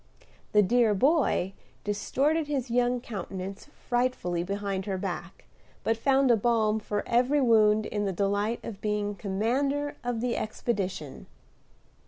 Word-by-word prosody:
The 210 0 +6
"dear 225 +1 +3
boy" 260 - +2 0.3
distorted 280 +10 0
his 270 -5 -2
young 245 +1 +2
countenance 195 -3 -6
frightfully 245 -11 -1
behind 195 0 -3
her 195 -2 -1
back, 180 -2 -5 0.4
but 225 - +2
found 270 +2 +3
a - - +6
balm 220 -1 +2
for 205 -1 -3
every 250 +5 +3
wound 215 -4 +4
in 205 -1 -2
the 195 - 0
delight 205 +4 0
of 205 -3 -7
being 210 -1 -1
commander 255 +9 -1
of 245 -2 -2
the 240 0 -1
expedition. 195 - -3
215 Hz, 135 wpm, -28 LUFS, 200-245 Hz, 0.4 s, The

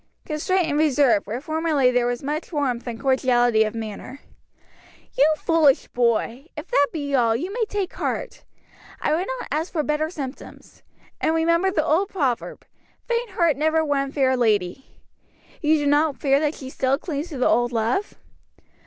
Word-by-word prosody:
"Constraint 350 +4 0
and 295 -1 -1
reserve, 280 -9 +3
where 225 +4 -3
formerly 310 -3 +1
there 245 -1 +1
was 245 +1 -3
much 300 +5 -4
warmth 260 -6 -2
and 230 -1 -5
cordiality 245 -3 +3
of 215 +1 -4
manner." 225 +4 -7 1.0
"You 290 +3 +4
foolish 315 -5 +2
boy! 240 +3 0
if 305 +4 -7
that 285 0 +4
be 285 -3 -4
all, 230 -4 +3
you 350 - -4
may 460 0 0
take 410 -3 -3
heart. - - -4 0.6
I 300 - 0
would 350 +4 -1
not - - -8
ask 320 +4 -2
for 310 -3 -1
better 300 +1 -1
symptoms. 280 -5 -9 0.4
And 320 - +1
remember 335 +3 +2
the 315 -5 0
old 335 +5 +1
proverb 275 -11 -2 0.4
'Faint 475 -1 -1
heart 340 -7 +1
never 315 +2 +1
won 275 -2 -1
fair 265 -2 +2
lady.' 215 -1 0 0.7
You 310 -1 +3
do 290 - -2
not 290 0 +2
fear 275 -1 +3
that 300 0 -1
she 265 -1 -9
still 265 +1 +1
clings 300 0 -5
to 295 - -6
the 250 - +2
old 240 0 +2
love?" 235 - -1
290 Hz, 170 wpm, -23 LUFS, 250-320 Hz, 1.0 s, You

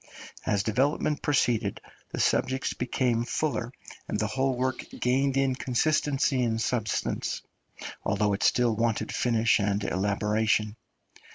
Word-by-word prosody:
As 100 -1 +2
development 140 +6 +1
proceeded 115 -8 +1 0.3
the - - -4
subjects 130 0 +1
became 125 -1 0
fuller, 125 -2 -2 0.4
and - - -2
the - - +1
whole 135 -1 0
work 130 0 -1 0.2
gained 135 +2 +1
in 135 -1 +2
consistency 135 +1 +1
and 115 -1 0
substance, 115 -2 -1 0.6
although 105 0 +1
it 100 - -2
still 120 -3 +3
wanted 115 0 -1
finish 115 -2 +2
and 100 0 0
elaboration. 105 +2 0
120 Hz, 120 wpm, -27 LUFS, 105-130 Hz, 0.6 s, still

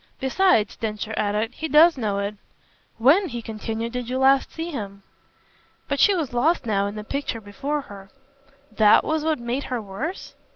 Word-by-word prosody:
Besides," 265 - +2
Densher 215 0 -4
added, 215 +3 -1
"he 320 - -4
does 320 +3 +6
know 215 -6 -2
it. 200 +1 -2 0.6
When," 310 - +4
he 240 -2 -5
continued, 225 +1 -4
"did 250 -1 -4
you 255 - -1
last 270 +1 +3
see 330 +1 -5
him?" 200 -7 -7 0.8
But 280 0 -2
she 405 - +5
was 310 -8 -3
lost 290 +5 +1
now 200 -3 +1
in 205 - -6
the 210 - -6
picture 275 0 -3
before 270 +9 -4
her. 195 -6 -12 0.6
"THAT 210 -1 +5
was 315 -1 -1
what 315 -1 +1
made 240 +3 -3
her 250 -2 -3
worse?" 225 - -6
240 Hz, 175 wpm, -23 LUFS, 210-295 Hz, 0.8 s, does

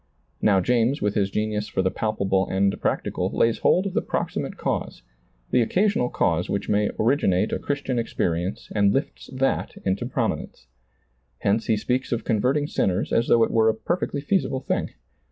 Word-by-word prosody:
Now 100 -2 +4
James 125 +5 +2
with 105 0 0
his 100 -2 +1
genius 105 +1 -2
for 95 - -1
the 95 - +1
palpable 95 -3 0
and 100 +1 0
practical - - -1
lays 115 0 +1
hold 185 - +3
of 195 - -3
the - - +1
proximate - - -3
cause, - - -3 0.5
the 125 - +4
occasional 180 - +1
cause 85 +1 0
which 100 - -2
may 105 0 +2
originate 110 -5 +2
a - - -1
Christian 140 -3 -2
experience 90 -5 -2
and 100 -2 +3
lifts 135 - -3
that 135 +1 -1
into 95 0 0
prominence. - - -3 0.8
Hence 105 +3 +1
he 110 - +2
speaks 125 +5 -1
of 120 - -1
converting 130 +7 +1
sinners 95 -9 -1
as 115 - +2
though 115 - +5
it - - 0
were 110 -1 +4
a 110 - +1
perfectly 145 +2 -2
feasible 140 -4 0
thing. - - -1
110 Hz, 170 wpm, -24 LUFS, 100-130 Hz, 0.8 s, though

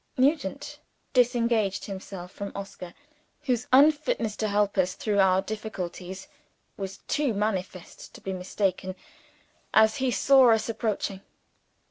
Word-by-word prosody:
Nugent 285 +1 0 0.3
disengaged 235 -5 +2
himself 190 -2 -8
from 200 0 -6
Oscar 195 -3 -8 0.5
whose 250 -4 -1
unfitness 280 -5 +4
to 215 - -1
help 205 0 +1
us 185 0 +1
through 205 -2 -1
our 190 0 +4
difficulties 190 -3 -6 0.5
was 195 -1 -6
too 290 -7 0
manifest 190 -4 -4
to - - -10
be 190 - -4
mistaken 185 0 -2 0.8
as 220 0 +5
he 260 0 0
saw 260 0 +5
us 225 - 0
approaching. 215 -4 -2
210 Hz, 120 wpm, -27 LUFS, 190-245 Hz, 0.8 s, as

